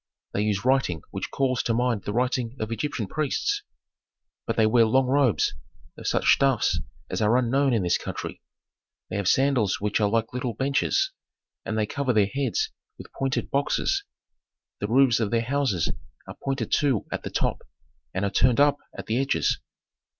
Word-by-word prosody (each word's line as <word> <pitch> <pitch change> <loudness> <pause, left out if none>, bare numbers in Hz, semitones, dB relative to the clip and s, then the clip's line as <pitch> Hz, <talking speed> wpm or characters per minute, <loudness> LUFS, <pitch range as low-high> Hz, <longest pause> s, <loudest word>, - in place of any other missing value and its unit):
They 100 - 0
use 105 -1 0
writing 130 - +1
which - - -4
calls 130 -2 0
to 115 - 0
mind 120 -4 0
the - - -2
writing 125 +1 -1
of 110 +1 -3
Egyptian 115 0 -2
priests. 155 - -1 0.9
But - - 0
they 110 - +5
wear 115 +1 +4
long 130 +4 +3
robes 130 -4 +2 0.4
of - - -7
such - - +1
stuffs 135 -5 +2 0.3
as - - -2
are 110 +3 +4
unknown 130 +3 +2
in 115 -5 +1
this 90 - +2
country; - - -6 0.7
they - - -2
have 100 -2 -1
sandals 130 -4 +2
which 105 +1 0
are 105 - +3
like 115 +1 0
little 125 -3 -3
benches, 140 - +1 0.5
and 110 - -2
they 110 - +2
cover 130 +3 -1
their 105 -2 +4
heads 135 +3 -1 0.3
with - - -12
pointed 135 0 -2
boxes. 265 - +1 0.8
The 105 - -2
roofs 125 +1 +4
of 110 -3 0
their 115 +1 +1
houses 130 - 0 0.4
are - - -8
pointed 135 0 -2
too 135 -8 +2
at - - -3
the - - -5
top, - - -1 0.5
and 95 +8 -1
are 100 - -1
turned 120 +4 +3
up 145 0 +5 0.2
at - - -6
the 115 +3 0
edges. 135 0 +1
125 Hz, 180 wpm, -25 LUFS, 110-135 Hz, 0.9 s, they